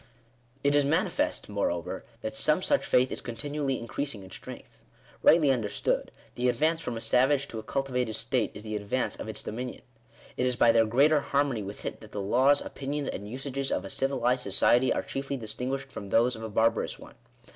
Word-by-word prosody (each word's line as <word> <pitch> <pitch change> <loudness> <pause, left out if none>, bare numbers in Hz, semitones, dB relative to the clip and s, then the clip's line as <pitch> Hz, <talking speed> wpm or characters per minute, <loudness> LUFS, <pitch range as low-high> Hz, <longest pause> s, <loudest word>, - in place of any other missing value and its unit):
It 140 0 +3
is 145 0 +4
manifest, 185 - 0
moreover, 95 -5 -2 0.2
that 110 - -4
some 155 +5 +2
such 285 - +2
faith 130 +1 +3
is - - -3
continually 135 +3 -3
increasing 115 -2 -4
in 95 - -13
strength. - - -10 0.4
Rightly 155 -4 +6
understood, 110 -6 -1 0.2
the 125 +1 +1
advance 155 +7 +1
from 120 -7 -4
a - - -3
savage 130 +5 +3
to 110 - -5
a - - -5
cultivated 125 -1 -2
state 115 0 0
is 105 - -7
the 110 -1 -4
advance 105 +5 -1
of - - -6
its 110 - -2
dominion. 125 +3 -5 0.5
It 125 - +1
is 125 - +1
by 120 - +5
their 115 -1 +4
greater 145 +7 +4
harmony 140 -4 0
with 100 +1 -7
it - - -5
that 110 -1 -13
the 105 - -3
laws, 130 +8 +3
opinions, 140 +1 -4
and 100 +1 -6
usages 135 +2 -3
of - - -1
a - - -5
civilized 130 -2 +1
society 120 +5 +4
are - - 0
chiefly 135 0 -4
distinguished 130 +4 -4
from 100 - -7
those 120 +4 +3
of 110 - -9
a 110 - -5
barbarous 115 +2 +1
one. - - -13
125 Hz, 195 wpm, -28 LUFS, 110-140 Hz, 0.5 s, Rightly